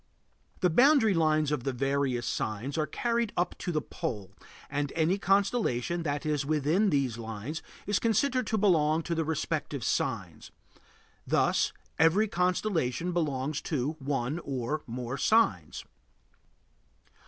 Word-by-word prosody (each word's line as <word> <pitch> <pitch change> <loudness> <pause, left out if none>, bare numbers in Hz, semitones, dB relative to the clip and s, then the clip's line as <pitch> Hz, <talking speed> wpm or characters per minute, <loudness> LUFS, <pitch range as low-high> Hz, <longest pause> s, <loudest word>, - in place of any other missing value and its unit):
The 180 - +3
boundary 250 - +5
lines 155 -3 +2
of 145 -5 -1
the 135 - -1
various 135 -1 0
signs 110 +6 -3
are 155 -1 0
carried 235 -2 -1
up 175 - 0
to 175 - -3
the 155 -3 -1
pole, 100 -5 -5 0.4
and 145 0 -2
any 165 +4 +2
constellation 195 - +1
that 145 -2 -2
is 150 -2 0
within 155 +8 +2
these 135 -7 0
lines 115 +7 -5 0.2
is 205 -1 +1
considered 250 +3 +1
to 220 - 0
belong 165 -6 +3
to 170 - -2
the 165 -1 0
respective 155 -3 -2
sign; 95 -12 -2 0.9
thus, - - +2 0.3
every 170 +7 +4
constellation 180 - 0
belongs 150 -4 -1
to 145 -2 -1
one 135 +2 -2
or 140 0 -3
more 125 +2 -4
signs. 225 +1 +2
155 Hz, 130 wpm, -29 LUFS, 135-180 Hz, 0.9 s, boundary